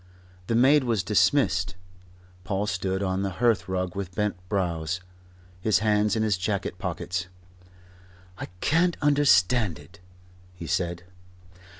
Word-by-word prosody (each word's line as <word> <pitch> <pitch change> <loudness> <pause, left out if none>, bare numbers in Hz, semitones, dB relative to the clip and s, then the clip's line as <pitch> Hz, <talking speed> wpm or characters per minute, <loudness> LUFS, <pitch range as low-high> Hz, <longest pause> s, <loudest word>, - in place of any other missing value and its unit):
The 115 - 0
maid 135 +4 +5
was 115 -6 0
dismissed. 95 -3 +2 0.7
Paul 100 +1 -1
stood 95 -1 -2
on 95 0 -1
the 100 -1 -2
hearthrug 95 -5 0
with 95 -2 -5
bent 105 -1 0
brows, 90 -4 -1 0.6
his 110 +3 +2
hands 105 -1 +2
in 110 - +1
his 105 -3 +1
jacket 100 -1 -2
pockets. 90 0 -3 1.1
"I - - -5
can't 175 +2 +2
understand 125 - +3
it," - - -16 0.6
he 85 - -8
said. 85 0 -2
95 Hz, 120 wpm, -26 LUFS, 90-110 Hz, 1.1 s, maid